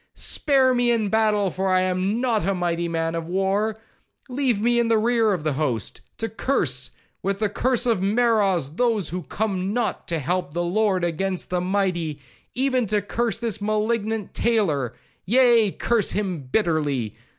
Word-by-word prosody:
—Spare 265 -3 +2
me 245 -1 +2
in 230 -2 +2
the 205 - -2
battle, 210 -3 +2
for 190 +2 -2
I 185 -1 +3
am 185 +4 0
not 240 -6 +1
a 195 +2 0
mighty 170 -1 -1
man 165 -1 -1
of 165 0 -4
war; 195 +4 0 0.5
leave 250 -4 0
me 240 +2 +2
in 235 - +2
the 225 -1 +3
rear 225 0 +2
of 180 -6 -2
the 155 -2 0
host, 130 -8 -2 0.2
to 225 - -2
curse, 170 - 0 0.3
with 195 0 -1
the 215 0 0
curse 245 +3 +1
of 225 -6 +1
Meroz, 200 - +1
those 225 -8 +1
who 180 +2 -4
come 195 -1 -2
not 240 -1 -2
to 170 - -1
the - - -1
help 180 +6 -1
of - - -20
the 175 - 0
Lord 190 0 +1
against 180 +3 -2
the 180 -1 0
mighty,—even 185 - -2
to 205 0 +1
curse 230 +1 -1
this 225 -2 -2
malignant 215 0 -1
tailor,—yea, 215 - +2
curse 235 -4 0
him 185 -9 -3
bitterly. 150 - 0
200 Hz, 175 wpm, -23 LUFS, 175-225 Hz, 0.5 s, I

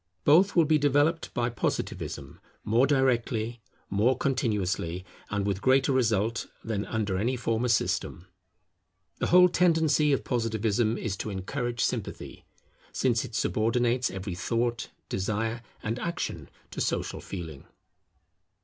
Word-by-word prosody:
Both 175 +7 +5
will 170 -2 +5
be 155 0 +3
developed 145 +3 +2
by 120 0 0
Positivism, 120 - -3 0.2
more 120 +5 +3
directly, 120 -4 +1 0.3
more 115 +6 +2
continuously, 95 -9 -1 0.2
and 100 -1 -1
with 100 -1 -1
greater 130 +3 +3
result, 115 -3 +1 0.2
than 105 -2 -3
under 105 -4 -1
any 120 +6 0
former 115 +1 0
system. 110 -6 0 0.9
The - - 0
whole 180 +1 +7
tendency 160 -4 +3
of 135 - +1
Positivism 115 -1 0
is 105 -4 -3
to 110 - -4
encourage 115 +5 -3
sympathy; - - -4 0.5
since 120 -3 +1
it 120 -4 -8
subordinates 120 +3 +1
every 95 0 -5
thought, 115 +6 -1 0.2
desire, 110 +4 -2 0.2
and 115 +3 -2
action 170 +3 -4 0.2
to - - -4
social - - -2
feeling. 80 -7 -7
115 Hz, 125 wpm, -28 LUFS, 105-130 Hz, 0.9 s, whole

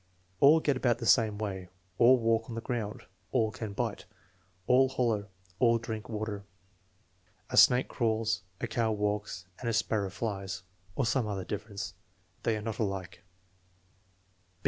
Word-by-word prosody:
"All 150 +3 +7
get 145 -3 +1
about 120 -2 +2
the 120 - -5
same 110 -3 +4
way." 95 -4 -4 0.3
"All 125 +2 +7
walk 115 -1 +1
on 115 - -5
the 115 - -3
ground." 115 -4 -3 0.3
"AH 110 -3 +3
can 110 -2 -6
bite." - - -3 0.6
"All 130 +3 +5
holler." 115 -6 0 0.3
"All 115 -2 +5
drink 110 -1 -6
water." 105 -2 -4 1.1
"A - - -1
snake 125 +1 +7
crawls, 110 -1 0 0.2
a - - -1
cow 115 -1 0
walks, 105 -3 -2
and 120 - -2
a - - 0
sparrow 110 -2 +1
flies" 95 -3 -4 0.3
(or 135 - +1
some 120 -1 +1
other 95 -3 -3
difference). 100 -2 -5 0.5
"They 110 -2 +1
are 105 - -6
not 110 -1 -4
alike." 95 -4 -3
110 Hz, 150 wpm, -30 LUFS, 105-120 Hz, 1.1 s, All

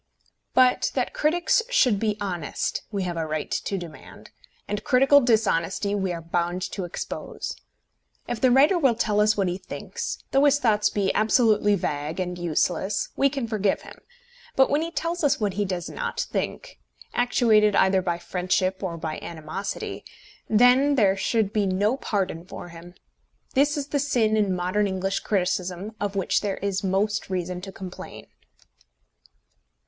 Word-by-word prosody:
But 255 -1 +4
that - - -1
critics 345 +8 +2
should 250 - +3
be 215 -1 0
honest 180 -7 -3
we 200 -2 -2
have 175 -2 -3
a 160 -1 -2
right 155 -1 -3
to 195 - -2
demand, 170 -4 -11 0.4
and 205 0 -3
critical 270 +3 +5
dishonesty 205 -5 +1
we 190 -2 -1
are 170 -1 -5
bound 175 +2 -1
to 190 - -4
expose. 175 - -6 0.7
If 240 -2 -4
the 255 - +5
writer 290 +8 +5
will 265 -7 +3
tell 210 -2 +1
us 210 0 +3
what 195 -2 +1
he 180 +1 -2
thinks, - - -5
though 275 +1 +4
his 285 0 +5
thoughts 210 -6 +2
be 195 -2 0
absolutely 215 -2 +3
vague 150 -1 -3
and 180 -1 -2
useless, 175 +4 0
we 275 - +3
can 270 -3 -3
forgive 210 -3 0
him; - - -13 0.5
but 265 - +4
when 290 +2 +2
he 330 - -2
tells 335 0 -3
us 285 - +3
what 205 -3 0
he 205 +2 -1
does 180 -3 -3
not 480 -1 -3
think, - - -4 0.3
actuated 220 -4 +3
either 190 -1 +4
by 175 -2 -1
friendship 185 +2 -1
or 175 -4 -3
by 160 -1 -4
animosity, 170 +4 -6 0.5
then 250 +6 +5
there 200 -6 +4
should 210 +1 0
be 210 -2 +1
no 200 +6 +1
pardon 195 -9 -2
for 175 -1 -9
him. 170 +1 -12 0.6
This 290 +3 +2
is 285 0 -4
the 285 - 0
sin 240 -6 +1
in 205 -3 +1
modern 185 +4 0
English 195 0 -1
criticism 185 +1 -2
of 205 -1 -2
which 195 -2 +1
there 200 -2 -2
is 195 -1 -2
most 200 +3 0
reason 180 -1 -3
to 195 +1 -8
complain. 185 -1 -9
200 Hz, 165 wpm, -25 LUFS, 180-240 Hz, 0.7 s, critical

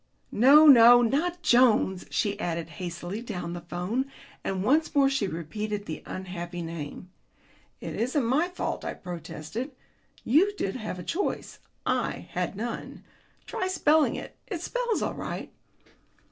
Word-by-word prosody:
"No, 280 +7 +7
no, 245 -3 +9
not 335 +9 0
Jones," 235 -8 +4
she 205 -1 -1
added 170 -2 -3
hastily 175 +4 -5
down 180 -7 -5
the 175 - -5
telephone, 185 +11 -3 0.3
and 190 -1 -2
once 300 +7 +2
more 275 -1 +5
she 250 -7 0
repeated 205 +5 -4
the 160 - -6
unhappy 175 -2 -5
name. 165 +2 -7 0.7
"It - - -5
isn't 255 +3 0
my 280 +9 +2
fault," 360 - -4
I - - -4
protested. 175 - -6 0.5
"You 370 - +3
did 195 - -2
have 215 -6 -5
a 180 - -7
choice; 385 - -3 0.3
I - - -1
had - - -2
none. 230 +4 -5 0.4
Try 370 - -2
spelling 315 -4 +3
it. - - -8
It 355 -6 -4
spells 485 0 -1
all - - -1
right." - - -6
220 Hz, 145 wpm, -27 LUFS, 180-285 Hz, 0.7 s, no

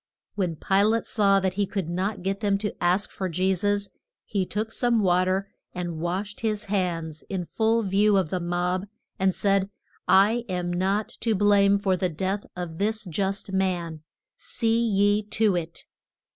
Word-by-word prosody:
When 180 -5 -1
Pi 195 +5 +2
late 220 +2 +2
saw 200 -2 +3
that 190 -1 0
he 200 +1 0
could 195 -5 -3
not 185 +3 -2
get 195 +1 -1
them 200 -2 +1
to 205 0 -3
ask 180 +4 +2
for 190 -1 -3
Je 185 +3 +1
sus, 205 +2 0 0.4
he 195 -3 -1
took 215 +2 -3
some 235 -2 +1
wa 180 0 +3
ter 190 +1 0 0.3
and 175 -3 -4
washed 190 +5 -3
his 215 -1 -1
hands 175 -6 -2
in 185 -3 -3
full 225 +4 +1
view 200 +1 +3
of 185 -5 0
the 185 - 0
mob, 180 +2 -1 0.3
and 190 -1 +2
said, 195 -1 +1 0.4
I 205 +6 +4
am 180 -1 -2
not 195 +4 0
to 225 -2 +1
blame 200 0 +4
for 195 -2 +1
the 180 0 -1
death 190 +5 -3
of 175 -3 -6
this 215 +2 -1
just 195 +3 -2
man; 175 -4 -1 0.4
see 230 0 0
ye 205 -1 +3
to 215 -1 +1
it. 170 -1 -5
195 Hz, 175 wpm, -25 LUFS, 180-205 Hz, 0.4 s, I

